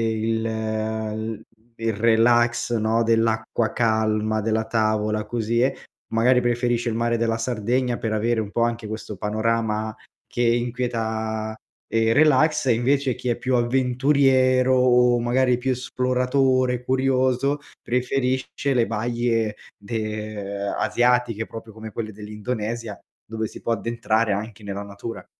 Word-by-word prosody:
il 110 Hz, 0 st, 0 dB
l 110 Hz, 0 st, -3 dB, 0.4 s
il 115 Hz, 0 st, -1 dB
relax, 120 Hz, +2 st, +3 dB
no, 110 Hz, +1 st, +1 dB
dell'acqua 115 Hz, 0 st, +1 dB
calma, 110 Hz, -1 st, +1 dB
della 110 Hz, 0 st, 0 dB
tavola, 110 Hz, -1 st, 0 dB
così 115 Hz, +1 st, -1 dB
eh, 130 Hz, -, +2 dB, 0.4 s
magari 125 Hz, +3 st, +4 dB
preferisce 120 Hz, 0 st, 0 dB
il -, -, -3 dB
mare 120 Hz, 0 st, +1 dB
della 115 Hz, 0 st, 0 dB
Sardegna 120 Hz, +2 st, 0 dB
per 110 Hz, -1 st, -2 dB
avere 110 Hz, +1 st, +1 dB
un 105 Hz, -, -5 dB
po' 115 Hz, +3 st, 0 dB
anche 115 Hz, -1 st, -1 dB
questo 110 Hz, -1 st, -6 dB
panorama 110 Hz, +1 st, -1 dB, 0.3 s
che 120 Hz, -, -2 dB
inquieta, 115 Hz, -2 st, -1 dB, 0.3 s
ehm, 115 Hz, 0 st, +2 dB
relax. 150 Hz, 0 st, +4 dB
E 120 Hz, -, +4 dB
invece 130 Hz, +2 st, +1 dB
chi 125 Hz, -1 st, -3 dB
è 115 Hz, -, 0 dB
più 130 Hz, 0 st, -1 dB
avventuriero, 130 Hz, +1 st, +3 dB
o 125 Hz, -1 st, +4 dB
magari 125 Hz, +1 st, +2 dB
più 130 Hz, +1 st, -1 dB
esploratore, 125 Hz, 0 st, +1 dB
curioso, 130 Hz, +1 st, +1 dB, 0.2 s
preferisce 130 Hz, +2 st, -1 dB
le 120 Hz, -2 st, +3 dB
baie 115 Hz, -1 st, -1 dB, 0.2 s
de 105 Hz, -2 st, -4 dB
ehm, -, -, -2 dB
asiatiche, 120 Hz, -2 st, +1 dB
proprio 115 Hz, -1 st, -9 dB
come 110 Hz, 0 st, -9 dB
quelle 110 Hz, -2 st, -5 dB
dell'Indonesia 105 Hz, +1 st, -5 dB, 0.3 s
dove 110 Hz, 0 st, -3 dB
si -, -, -10 dB
può 115 Hz, -, 0 dB
addentrare 115 Hz, -1 st, 0 dB
anche 105 Hz, +1 st, -4 dB
nella 100 Hz, 0 st, -4 dB
natura. 100 Hz, +3 st, -7 dB
115 Hz, 130 wpm, -23 LUFS, 110-125 Hz, 0.4 s, magari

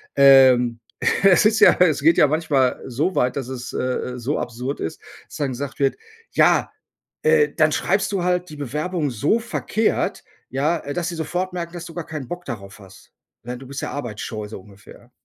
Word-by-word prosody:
ähm. 130 Hz, -4 st, +6 dB, 0.4 s
Es 195 Hz, 0 st, +6 dB
ist 215 Hz, 0 st, +1 dB
ja -, -, +8 dB
es 170 Hz, -6 st, +3 dB
geht 165 Hz, +2 st, +5 dB
ja -, -, +6 dB
manchmal 145 Hz, -4 st, +1 dB
so 145 Hz, +9 st, -1 dB
weit, 125 Hz, 0 st, +1 dB
dass 135 Hz, -3 st, -4 dB
es, 125 Hz, -2 st, -7 dB
äh, -, -, -2 dB, 0.3 s
äh, 125 Hz, -, -7 dB
so 130 Hz, +6 st, -2 dB
absurd 125 Hz, +4 st, -4 dB
ist, 80 Hz, -, -5 dB, 0.3 s
dass -, -, -10 dB
dann 145 Hz, -2 st, -1 dB
gesagt 135 Hz, +2 st, -6 dB
wird: 135 Hz, -1 st, +2 dB, 0.4 s
„Ja, -, -, +3 dB, 0.5 s
äh, 465 Hz, -1 st, +4 dB
dann 155 Hz, -2 st, +3 dB
schreibst 195 Hz, +6 st, 0 dB
du 195 Hz, -3 st, -1 dB
halt 180 Hz, -1 st, 0 dB
die 150 Hz, -, -9 dB
Bewerbung 150 Hz, +3 st, -2 dB
so 145 Hz, -, +1 dB
verkehrt, 225 Hz, -1 st, -1 dB, 0.3 s
ja, 145 Hz, +6 st, 0 dB
äh, 145 Hz, -, -6 dB
dass 175 Hz, +2 st, -2 dB
sie 170 Hz, -, -5 dB
sofort 175 Hz, +3 st, -3 dB
merken, 170 Hz, -1 st, -5 dB
dass 175 Hz, -1 st, -7 dB
du 165 Hz, -, -10 dB
gar 170 Hz, -3 st, -5 dB
keinen 150 Hz, -5 st, -6 dB
Bock 175 Hz, +3 st, -7 dB
darauf 100 Hz, -6 st, -7 dB
hast. 95 Hz, -2 st, -16 dB, 0.3 s
Ne, 125 Hz, +1 st, -6 dB
du 135 Hz, -, -12 dB
bist 140 Hz, +1 st, -6 dB
ja -, -, -4 dB
arbeitsscheu“, 110 Hz, -5 st, -5 dB
so 105 Hz, -, -8 dB
ungefähr. 100 Hz, 0 st, -17 dB
145 Hz, 200 wpm, -22 LUFS, 125-175 Hz, 0.5 s, ja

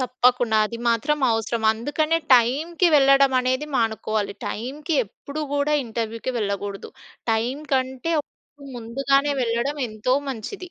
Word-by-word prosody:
తప్పకుండా. 250 Hz, -2 st, +2 dB
అది 230 Hz, +2 st, -7 dB
మాత్రం 235 Hz, +6 st, +1 dB
అవసరం. 225 Hz, +1 st, -2 dB
అందుకనే 295 Hz, +8 st, 0 dB, 0.2 s
టై‌మ్‌కి 290 Hz, +9 st, +3 dB
వెళ్ళడం 275 Hz, -1 st, +5 dB
అనేది 255 Hz, +3 st, -1 dB
మానుకోవాలి. 220 Hz, -2 st, -1 dB
టై‌మ్‌కి 290 Hz, +8 st, -4 dB
ఎప్పుడు 285 Hz, +9 st, -7 dB
కూడా 290 Hz, +1 st, +1 dB
ఇంటర్వ్యూకి 230 Hz, +1 st, -4 dB
వెళ్ళకూడదు. 200 Hz, -1 st, -4 dB, 0.4 s
టై‌మ్‌కి 250 Hz, +7 st, -2 dB
కంటే 260 Hz, +4 st, -1 dB, 0.6 s
ముందుగానే 275 Hz, +5 st, +1 dB
వెళ్ళడం 235 Hz, +5 st, -1 dB
ఎంతో 215 Hz, +4 st, -1 dB
మంచిది. 345 Hz, -, -6 dB
250 Hz, 110 wpm, -23 LUFS, 225-285 Hz, 0.6 s, వెళ్ళడం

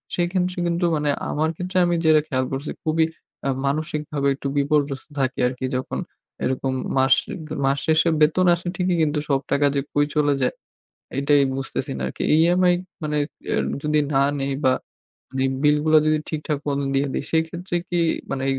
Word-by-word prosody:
সেক্ষেত্রে 180 Hz, +1 st, 0 dB
কিন্তু 170 Hz, +1 st, 0 dB
মানে 150 Hz, -1 st, 0 dB, 0.2 s
আমার 155 Hz, +2 st, 0 dB
ক্ষেত্রে 185 Hz, +1 st, -3 dB
আমি 175 Hz, 0 st, +1 dB
যেটা 155 Hz, -1 st, +6 dB
খেয়াল 130 Hz, -2 st, 0 dB
করছি 135 Hz, +3 st, -3 dB
খুবই 160 Hz, 0 st, +2 dB, 0.4 s
আ -, -, +2 dB, 0.2 s
মানসিকভাবে 150 Hz, 0 st, -1 dB
একটু 140 Hz, -, -5 dB
বিপর্যস্ত 140 Hz, -1 st, 0 dB
থাকি 130 Hz, -1 st, 0 dB
আরকি 130 Hz, +1 st, -4 dB
যখন 130 Hz, -, -3 dB, 0.4 s
এরকম 130 Hz, +1 st, -1 dB, 0.2 s
মাস 130 Hz, 0 st, +5 dB, 0.5 s
মাস 135 Hz, +1 st, +2 dB
শেষে 160 Hz, +1 st, +4 dB
বেতন 165 Hz, +5 st, +4 dB
আসে 175 Hz, +1 st, -8 dB
ঠিকই 180 Hz, -1 st, +1 dB
কিন্তু 150 Hz, -1 st, +1 dB
সব 135 Hz, -1 st, +3 dB
টাকা 145 Hz, 0 st, +3 dB
যে 140 Hz, -, +2 dB
কই 145 Hz, 0 st, +3 dB
চলে 145 Hz, -1 st, +3 dB
যায়। 125 Hz, -, +1 dB, 0.7 s
এটাই 140 Hz, 0 st, +4 dB
বুঝতেছি 135 Hz, -1 st, -4 dB
না 65 Hz, -, -4 dB
আরকি। -, -, -5 dB
EMI 175 Hz, +2 st, +4 dB, 0.3 s
মানে 150 Hz, 0 st, -1 dB, 0.4 s
এ -, -, +2 dB, 0.3 s
যদি 150 Hz, 0 st, +2 dB
না 135 Hz, -, +4 dB, 0.2 s
নেই 135 Hz, 0 st, -1 dB
বা 130 Hz, -, +5 dB, 0.6 s
মানে 130 Hz, 0 st, 0 dB, 0.2 s
বিল 150 Hz, 0 st, +5 dB
গুলা 155 Hz, 0 st, +6 dB
যদি 155 Hz, 0 st, +3 dB
ঠিকঠাক 150 Hz, -2 st, -2 dB
মতন 140 Hz, 0 st, 0 dB
দিয়ে 140 Hz, +1 st, +2 dB
দেই -, -, -2 dB
সেইক্ষেত্রে 170 Hz, +2 st, -1 dB
কি 175 Hz, -, 0 dB, 0.3 s
মানে 135 Hz, -1 st, -2 dB
150 Hz, 170 wpm, -23 LUFS, 140-160 Hz, 0.7 s, যেটা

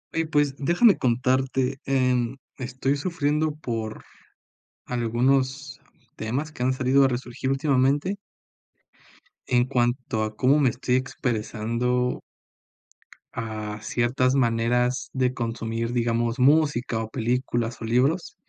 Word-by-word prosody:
Oye, 165 Hz, 0 st, 0 dB
pues, 145 Hz, -3 st, +1 dB
déjame 175 Hz, -, +4 dB
contarte, 130 Hz, +2 st, +1 dB
em, 125 Hz, -2 st, +1 dB, 0.2 s
estoy 130 Hz, +2 st, -1 dB
sufriendo 150 Hz, -2 st, 0 dB
por 115 Hz, -7 st, -5 dB, 0.8 s
algunos 130 Hz, +3 st, 0 dB, 0.4 s
temas 130 Hz, +8 st, -3 dB
que 150 Hz, -, -10 dB
han 130 Hz, +1 st, +2 dB
salido 130 Hz, +1 st, +3 dB
a -, -, +5 dB
resurgir 130 Hz, +1 st, -3 dB
últimamente 140 Hz, +5 st, +1 dB, 1.3 s
en 125 Hz, -1 st, +3 dB
cuanto 120 Hz, -3 st, 0 dB
a 110 Hz, 0 st, -4 dB
cómo 135 Hz, +6 st, +3 dB
me 135 Hz, -3 st, +4 dB
estoy 125 Hz, +2 st, -1 dB
expresando 125 Hz, 0 st, -1 dB, 1.1 s
a 110 Hz, -2 st, -5 dB
ciertas 125 Hz, +3 st, +1 dB
maneras 125 Hz, +1 st, +1 dB
de 130 Hz, -1 st, +1 dB
consumir, 115 Hz, -1 st, -3 dB
digamos, 115 Hz, 0 st, 0 dB
música 135 Hz, -4 st, +3 dB
o 110 Hz, -, -7 dB
películas 120 Hz, 0 st, -2 dB
o -, -, -4 dB
libros 135 Hz, +10 st, +1 dB
125 Hz, 110 wpm, -25 LUFS, 120-135 Hz, 1.3 s, a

